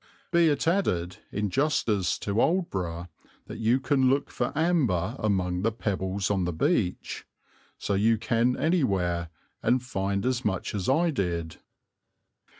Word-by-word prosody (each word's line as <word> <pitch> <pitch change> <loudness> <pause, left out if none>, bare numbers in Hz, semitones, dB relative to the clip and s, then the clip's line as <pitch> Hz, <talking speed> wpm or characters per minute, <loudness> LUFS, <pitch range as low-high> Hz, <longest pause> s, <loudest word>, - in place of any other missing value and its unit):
Be 170 -1 +5
it 145 +1 0
added, 95 - 0
in 105 -1 -2
justice 120 - +1
to 100 +2 -1
Aldeburgh, 90 - -1 0.4
that - - -8
you 115 +4 +3
can 130 -1 +2
look 140 +2 0
for 120 - -2
amber 130 - +1
among 90 -4 0
the 115 +3 +1
pebbles 100 -3 -2
on 95 -3 +1
the 90 - -1
beach. 95 - -1 0.5
So 100 - -2
you 110 +3 +3
can 115 +3 +1
anywhere 95 - +1 0.3
and 125 0 +2
find 100 -5 -2
as 125 -1 0
much 95 -3 -2
as 100 0 -2
I 165 +5 +3
did. 85 - -2
105 Hz, 145 wpm, -27 LUFS, 95-135 Hz, 0.5 s, Be